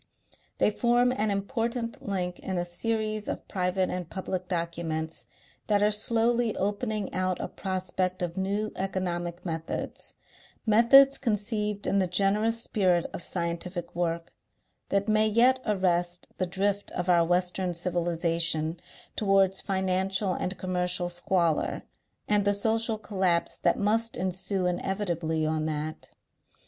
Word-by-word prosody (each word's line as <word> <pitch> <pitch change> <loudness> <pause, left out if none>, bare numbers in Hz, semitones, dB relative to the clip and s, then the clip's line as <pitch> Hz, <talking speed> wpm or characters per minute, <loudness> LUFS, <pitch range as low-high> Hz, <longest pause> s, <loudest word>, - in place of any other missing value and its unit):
They - - +3
form 240 +3 +3
an 215 -4 0
important 230 +3 -2
link 180 -3 -3
in 190 -1 -3
a 175 - 0
series 215 +3 -2
of - - -5
private 185 0 0
and 180 -2 -4
public 185 -1 -4
documents 165 -2 -3 0.4
that 205 -1 +3
are 210 - +4
slowly 230 +2 +2
opening 210 0 -2
out 185 -1 0
a - - -3
prospect 185 -1 -2
of 170 -1 -3
new 200 +3 -1
economic 180 -2 -3
methods, 165 -2 -4 0.5
methods 250 +5 +7
conceived 210 -3 -1
in 200 - +2
the 185 - +2
generous 205 +5 +2
spirit 185 -7 +2
of - - -5
scientific 170 0 -3
work, 170 -1 -2 0.6
that 200 +1 +1
may 215 0 +4
yet 245 +4 +4
arrest 175 -3 +1
the 185 - 0
drift 200 +2 -1
of 180 0 -3
our 175 -2 +5
western 180 +1 +1
civilization 170 -2 0 0.4
towards 195 -2 +3
financial 190 0 0
and 185 +1 -3
commercial 180 -1 -1
squalor 175 -2 0 0.4
and 210 -1 +3
the 205 0 +2
social 225 +2 +1
collapse 190 -5 0
that 170 - +2
must 225 +3 +1
ensue 185 +1 -1
inevitably 175 -3 -1
on 155 0 0
that. 155 0 -4
190 Hz, 130 wpm, -28 LUFS, 175-210 Hz, 0.6 s, methods